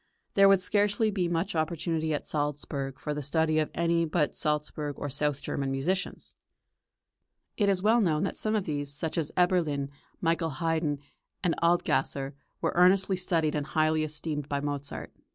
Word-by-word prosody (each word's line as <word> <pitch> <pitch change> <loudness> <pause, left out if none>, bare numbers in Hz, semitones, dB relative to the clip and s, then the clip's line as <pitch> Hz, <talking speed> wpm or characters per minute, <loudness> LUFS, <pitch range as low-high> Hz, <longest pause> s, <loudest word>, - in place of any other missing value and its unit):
There 195 0 +7
would 195 -1 +5
scarcely 205 +3 +2
be 185 -3 0
much 175 +3 -1
opportunity 160 0 -1
at 150 - -2
Salzburg 145 -2 -3
for 150 - -3
the 150 - -3
study 155 +2 +1
of 155 - 0
any 170 0 +2
but 160 -2 0
Salzburg 150 -1 -2
or 145 - -4
south 145 0 0
German 135 -1 -2
musicians. 145 +8 -2 1.2
It 205 -3 +2
is 190 -1 +1
well 225 +3 +5
known 160 -4 +2
that 195 - -2
some 215 0 -1
of 205 -3 0
these, 145 -2 -2
such 155 +2 -3
as 160 -3 -1
Eberlin, 165 -6 +2 0.3
Michael 165 0 +1
Haydn, 160 -3 0 0.5
and 175 -3 +2
Adlgasser, 160 -5 +1 0.3
were - - 0
earnestly 190 +2 +4
studied 170 -4 +1
and 150 -1 -2
highly 155 0 +2
esteemed 150 -1 -3
by 140 - 0
Mozart. 145 -1 -4
160 Hz, 165 wpm, -29 LUFS, 145-180 Hz, 1.2 s, There